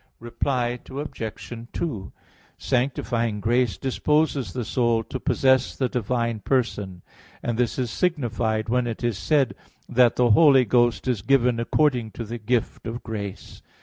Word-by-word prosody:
Reply 120 +1 -1
Obj. 135 -6 -6 0.2
2: 110 - -4 0.5
Sanctifying 120 -4 -1
grace 115 -2 +1
disposes 135 - 0
the 120 +4 -4
soul 120 -1 +1
to 130 - -6
possess 130 +1 +2
the 130 -2 0
divine 115 -1 -1
person; 105 -8 -1 0.4
and 120 - -1
this 120 -1 0
is 125 -3 -1
signified 115 -9 -1
when 125 +1 +1
it 115 +1 -5
is 120 -5 -1
said 135 - +2 0.3
that 125 -1 +4
the 120 -2 +3
Holy 135 0 +6
Ghost 120 +2 +2
is 120 -6 0
given 125 0 +2
according 125 -1 +1
to 115 - -5
the 115 +2 -6
gift 115 +1 -1
of 115 +2 -5
grace. 100 -4 -7
120 Hz, 145 wpm, -24 LUFS, 110-130 Hz, 0.5 s, Holy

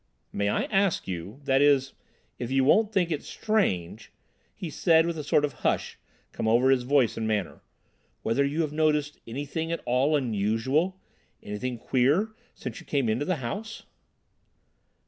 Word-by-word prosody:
"May 100 0 0
I - - +1
ask 195 -3 +1
you—that 130 - -1
is, 140 -2 +3 0.5
if 120 - -4
you 135 0 +2
won't 210 +10 +4
think 180 -5 +1
it 150 - -1
strange," 110 - -1 0.4
he 170 -4 -6
said, 160 +1 +4
and 170 0 -2
a 155 - -5
sort 145 +1 +3
of 145 - -5
hush - - -1 0.4
came - - -2
over 120 +4 +4
his 130 -2 +3
voice 130 -1 +2
and 110 - -2
manner, 105 -5 -2 0.6
"whether 115 +5 +2
you 145 +4 0
have 150 -2 -2
noticed 150 -1 +1
anything 145 +7 -4
at 170 - -3
all 130 +5 +2
unusual—anything 125 - -2
queer, 135 - +2 0.3
since - - -7
you 175 - -14
came 140 -6 +1
into 120 +7 0
the 185 - 0
house?" 215 - -5
140 Hz, 155 wpm, -27 LUFS, 115-160 Hz, 0.6 s, won't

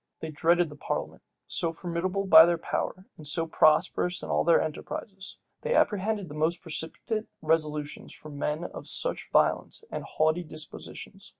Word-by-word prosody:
They 160 - -5
dreaded 170 +2 +3
the 150 - -10
parliament, - - -4 0.2
so 165 - 0
formidable 180 +3 -2
by 160 -3 +9
their 175 -1 +2
power, 185 +3 -3
and 155 - -8
so 165 +3 +1
prosperous 165 +3 +3
in - - -6
all - - +2
their 170 -1 +5
enterprises. 190 +5 -5 0.2
They 485 +1 0
apprehended 205 - +1
the 145 - -9
most 160 +3 +1
precipitate 170 +7 -3 0.2
resolutions 150 -2 -1
from 150 -2 -10
men 150 +3 -1
of - - -7
such - - -1
violent - - +2
and - - -4
haughty 155 +3 +1
dispositions. 165 +5 -8
165 Hz, 160 wpm, -28 LUFS, 155-185 Hz, 0.2 s, by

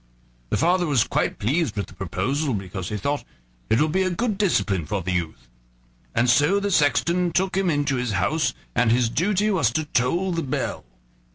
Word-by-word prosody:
The - - 0
father 175 +3 +2
was 135 -6 +3
quite - - -1
pleased 150 +9 0
with 100 - -2
the - - -15
proposal, 125 - -2
because 95 -2 -5
he 105 - -3
thought: 140 +8 -2 0.5
"It 115 - +3
will 155 - +3
be 185 +5 0
a 185 - +1
good 215 +4 -1
discipline 100 - +1
for 100 -3 -2
the 95 - -2
youth." 80 -9 -3 0.7
And 120 +2 +2
so 145 +11 +4
the 200 0 -2
sexton 170 +3 +2
took 190 +2 0
him 190 -2 +1
into 145 -3 0
his 125 -3 -2
house, 125 - 0 0.2
and 120 -2 +2
his 120 -1 +3
duty 205 - +1
was 165 - +2
to 155 +3 -1
toll 170 +8 0
the 170 -1 -1
bell. 135 - -3
145 Hz, 195 wpm, -23 LUFS, 110-175 Hz, 0.7 s, so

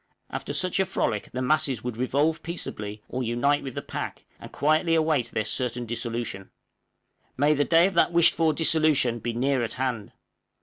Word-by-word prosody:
After - - -5
such 185 +1 +1
a 190 - +3
frolic 110 - -2
the 130 +1 -3
masses 130 -4 +1
would 125 -2 -4
revolve 145 +6 0
peaceably 105 -11 -6
or 130 - -4
unite 125 +5 +1
with 135 -3 -7
the - - -4
pack, - - -6
and - - -9
await - - -27
quietly 155 -1 +2
their 110 - -1
certain 125 +1 -2
dissolution; 115 -4 -4 0.9
may 145 +3 +4
the 145 -1 +1
day 165 +1 +5
of 195 - 0
that 170 - +3
wished 170 0 +5
for 160 -1 +2
dissolution 155 -6 +3
be 120 +1 -3
near 130 +1 +1
at 110 - -4
hand! 125 -5 -3
135 Hz, 180 wpm, -26 LUFS, 120-155 Hz, 0.9 s, day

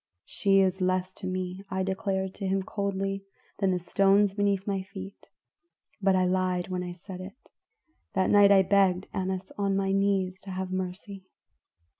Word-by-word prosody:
"'She 195 -1 +3
is 190 0 +1
less 185 0 0
to 190 - -7
me,' 185 +1 -4
I 190 0 -1
declared 190 -1 -2
to 195 - -4
him 190 0 0
coldly, 195 0 -2 0.4
'than 195 -2 +2
the 185 - +2
stones 195 +3 +3
beneath 200 -1 0
my 195 -2 -1
feet.' 190 +1 -10 0.7
But 195 -1 +3
I 185 -1 +3
lied 185 -1 0
when 180 -1 -2
I 180 0 -5
said 185 +1 -9
it. 200 +8 -12 0.6
That 190 -1 +2
night 205 -1 +7
I 195 -1 +7
begged 190 -1 +2
Annas 190 0 -3
on 200 -1 +1
my 195 0 0
knees 195 -1 +1
to 195 - -10
have 185 0 -4
mercy. 185 +1 -5
190 Hz, 170 wpm, -28 LUFS, 185-195 Hz, 0.7 s, night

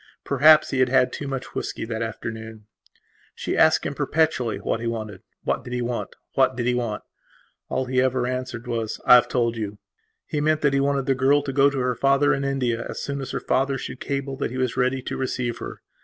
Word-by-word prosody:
Perhaps 155 +3 +5
he 135 - 0
had 130 -1 +4
had 125 0 +3
too 145 - -5
much 135 -2 -5
whisky - - -4
that 110 0 -4
afternoon. 110 -1 -6 0.7
She - - -3
asked - - +4
him - - -2
perpetually 140 -7 0
what - - -2
he 115 - -3
wanted. 110 -5 -4 0.2
What - - -1
did 120 - -7
he 125 0 -1
want? 120 0 -4 0.2
What 130 -1 +3
did 120 -1 -2
he 125 - +2
want? 120 -4 -2 0.7
And - - -2
all 130 - 0
he 130 0 +1
ever 130 -1 +1
answered 125 -1 -4
was: 115 -3 -3
"I - - +8
have 125 - +7
told 120 -2 0
you". 105 -2 -4 0.5
He 150 -3 -2
meant 155 +1 +2
that 145 -2 +2
he 140 - +3
wanted 140 -1 +1
the 135 - +2
girl 135 +3 +3
to 135 -2 -4
go 140 +1 +5
to 140 - -5
her 125 -1 +1
father 140 +3 +3
in 135 - -1
India 125 -4 -1
as - - -5
soon 140 -1 -4
as 135 - -6
her - - -2
father 135 +1 0
should 130 0 -7
cable 140 -1 -3
that - - -2
he 130 - -6
was 130 -2 0
ready 130 0 0
to - - -4
receive 120 -2 -2
her. - - -8
130 Hz, 230 wpm, -24 LUFS, 120-135 Hz, 0.7 s, I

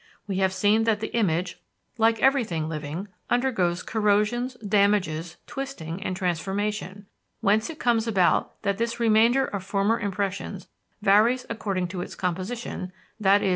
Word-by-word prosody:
We 195 -3 -3
have 190 -1 +2
seen 205 +4 +2
that 220 -2 +2
the 220 - -5
image, 180 -5 0 0.4
like 225 0 +3
everything 230 - +2
living, 155 +4 -5 0.2
undergoes 210 -9 +1
corrosions, 220 +4 +1
damages, 195 -6 +1
twisting, 195 -11 -6
and 185 -3 -3
transformation: 195 +3 -2 0.4
whence 215 +3 +2
it 320 - -7
comes 235 -4 +1
about 190 -6 +2
that 200 -1 0
this 235 0 -1
remainder 230 +3 +4
of 200 -2 -5
former 200 +3 +1
impressions 200 -1 -3 0.4
varies 220 +6 +4
according 195 -5 -2
to 180 0 -4
its - - -7
composition, 185 +1 -3 0.3
i.e. 195 0 +4
205 Hz, 135 wpm, -25 LUFS, 185-225 Hz, 0.4 s, remainder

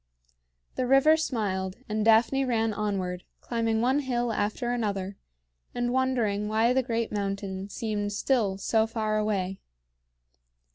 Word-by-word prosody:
The 255 - 0
river 270 +4 +6
smiled, 200 -11 -2
and 215 0 -1
Daphne 225 +5 +4
ran 225 -4 0
onward, 190 -4 -2 0.2
climbing 225 -2 -1
one 260 +4 +2
hill 245 -4 -1
after 215 +4 -1
another, 200 -5 -2 0.6
and 245 0 -1
wondering 235 -6 +1
why 220 +3 +2
the 265 - +3
great 230 -2 -2
mountain 195 -1 -3
seemed 210 -2 -3
still 205 -2 +1
so 220 +3 +1
far 215 -1 -1
away. 195 -3 -1
220 Hz, 130 wpm, -27 LUFS, 205-245 Hz, 0.6 s, river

